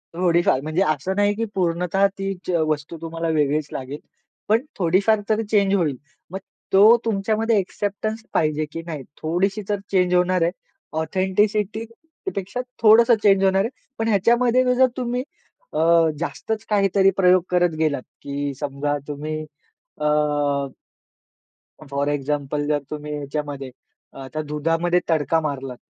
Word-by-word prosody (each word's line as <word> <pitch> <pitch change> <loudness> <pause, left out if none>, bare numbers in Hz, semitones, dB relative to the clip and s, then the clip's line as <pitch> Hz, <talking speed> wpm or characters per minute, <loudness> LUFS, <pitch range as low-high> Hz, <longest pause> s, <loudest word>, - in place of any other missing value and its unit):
थोडीफार, 170 -6 +2
म्हणजे 155 +5 -1
असं 155 +4 -1
नाही 205 0 +2
की 230 +2 -1
पूर्णतः 180 +1 +1
ती 195 0 -2
जे 180 -2 +1
वस्तू 155 +2 -3
तुम्हाला 165 0 -4
वेगळीच 150 0 +1
लागेल. 135 +3 -6 0.5
पण 220 +2 +3 0.2
थोडीफार 195 +5 +3
तरी 220 +1 +2
चेंज 200 -2 +2
होईल. 160 -8 +1 0.4
मग 190 - -4 0.3
तो 210 +5 +8
तुमच्यामध्ये 220 +1 +1
एक्सेप्टन्स 205 +3 -3
पाहिजे 155 0 +1
की 165 - -5
नाही, 155 -5 -6 0.2
थोडीशी 190 +6 0
तर 205 -1 0
चेंज 180 -2 +2
होणार 180 0 +2
आहे, 170 - +2 0.5
ऑथेंटिसिटी 205 +5 0 0.5
पेक्षा 195 +6 -3 0.2
थोडंसं 230 +2 +7
चेंज 195 -1 +5
होणार 195 0 +3
आहे. 225 - -1 0.3
पण 225 - -1
ह्याच्यामध्ये 235 +4 +3
जर 260 +1 +5
तुम्ही 250 0 -2 0.5
अ, - - -1 0.4
जास्तच 220 +6 -3
काहीतरी 195 -2 +3
प्रयोग 185 -1 +5
करत 180 -1 +3
गेलात, 150 -4 +1 0.2
की 140 0 -3
समजा 145 0 -2
तुम्ही 150 +1 -4 0.7
अ 150 - 0 1.8
फोर 140 +1 -1
एक्झाम्पल 145 0 -2
जर 150 -1 +1
तुम्ही 150 0 -5
ह्याच्यामध्ये 140 -2 -5 0.5
आता 155 +4 -5
दुधामध्ये 165 +4 +1
तडका 160 0 +2
मारलात, 135 -4 -4
180 Hz, 135 wpm, -22 LUFS, 150-205 Hz, 1.8 s, तो